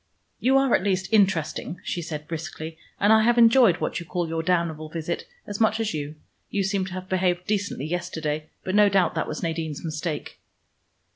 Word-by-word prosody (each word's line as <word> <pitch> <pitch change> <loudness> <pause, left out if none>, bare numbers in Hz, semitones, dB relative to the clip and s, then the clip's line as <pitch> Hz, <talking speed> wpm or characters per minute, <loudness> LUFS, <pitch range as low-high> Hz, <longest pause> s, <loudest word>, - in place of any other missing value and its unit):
"You 265 +2 +4
are 270 -2 +3
at - - +4
least 190 -1 0
interesting," 185 -5 +1
she 175 - -3
said 150 -2 -6
briskly, 160 0 -6 0.2
"and 205 +2 +5
I 220 - +6
have 240 +2 +3
enjoyed 230 -5 +6
what - - -2
you 170 - -8
call 175 -2 -2
your 165 0 -2
damnable 165 -3 0
visit 165 - -4 0.2
as 205 +2 -5
much 220 0 +3
as 220 -4 -1
you. 150 0 -4 0.3
You 200 - 0
seem 195 0 0
to 185 - -7
have 185 0 -6
behaved 180 -1 0
decently 200 -9 -1
yesterday, 155 -2 -3
but 185 - -3
no 205 0 +6
doubt 190 -4 +2
that - - -1
was 155 - -5
Nadine's 165 -2 -3
mistake." 155 0 -4
180 Hz, 195 wpm, -25 LUFS, 160-200 Hz, 0.3 s, I